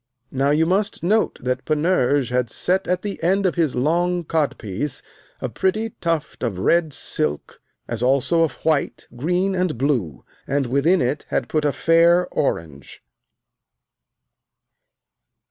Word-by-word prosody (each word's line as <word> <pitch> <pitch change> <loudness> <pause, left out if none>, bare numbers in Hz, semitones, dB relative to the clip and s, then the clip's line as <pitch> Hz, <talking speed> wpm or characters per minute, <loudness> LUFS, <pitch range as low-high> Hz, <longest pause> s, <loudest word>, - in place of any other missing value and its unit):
Now 135 +1 +1
you 155 +2 +3
must 190 0 -1
note 215 +5 +1
that 125 0 -1
Panurge 150 -4 +1
had 125 -2 0
set 185 +10 0
at 180 +1 0
the 205 -1 -5
end 190 +4 +2
of 185 - +2
his 165 -6 0
long 175 +6 +1
codpiece 145 - -2 0.4
a - - -2
pretty 215 +4 -1
tuft 165 -3 -2
of 115 -7 -2
red 160 - +2
silk, 75 - -3 0.3
as 115 -1 -4
also 135 +6 +2
of 165 - +1
white, 155 -3 0
green, 180 +9 0
and 180 -7 -1
blue, 115 - -1 0.2
and 140 0 0
within 140 +8 +2
it 135 +5 -2
had 125 - -1
put 155 -1 0
a 145 - +3
fair 170 +3 +4
orange. 80 - -3
155 Hz, 140 wpm, -22 LUFS, 130-175 Hz, 0.4 s, fair